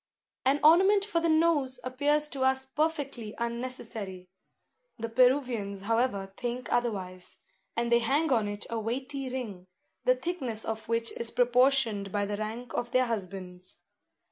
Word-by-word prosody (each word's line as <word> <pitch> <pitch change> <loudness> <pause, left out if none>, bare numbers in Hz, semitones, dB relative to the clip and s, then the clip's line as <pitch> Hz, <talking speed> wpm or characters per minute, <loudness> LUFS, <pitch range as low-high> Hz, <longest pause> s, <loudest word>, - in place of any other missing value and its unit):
An 275 +2 +3
ornament 385 +6 +6
for 345 -6 0
the 335 - +2
nose 315 -5 +3
appears 290 +4 +2
to 275 - -4
us 265 0 +2
perfectly 280 -6 -2
unnecessary. 230 -6 -4 0.7
The 230 -1 -4
Peruvians, 245 -5 +2
however, 205 -3 0
think 245 0 -3
otherwise; 190 -7 -2 0.4
and 235 0 0
they 235 - +6
hang 280 +6 +1
on 220 -4 +2
it 205 0 -4
a 230 - -1
weighty 260 +4 -3
ring, 215 -8 -5 0.4
the 255 - +5
thickness 255 -6 -3
of 220 0 -4
which 230 0 0
is 235 - -3
proportioned 245 -5 +3
by 205 0 0
the 205 0 -3
rank 220 +3 -5
of 240 0 -2
their 255 +1 +3
husbands. 185 -5 -4
240 Hz, 145 wpm, -29 LUFS, 215-265 Hz, 0.7 s, ornament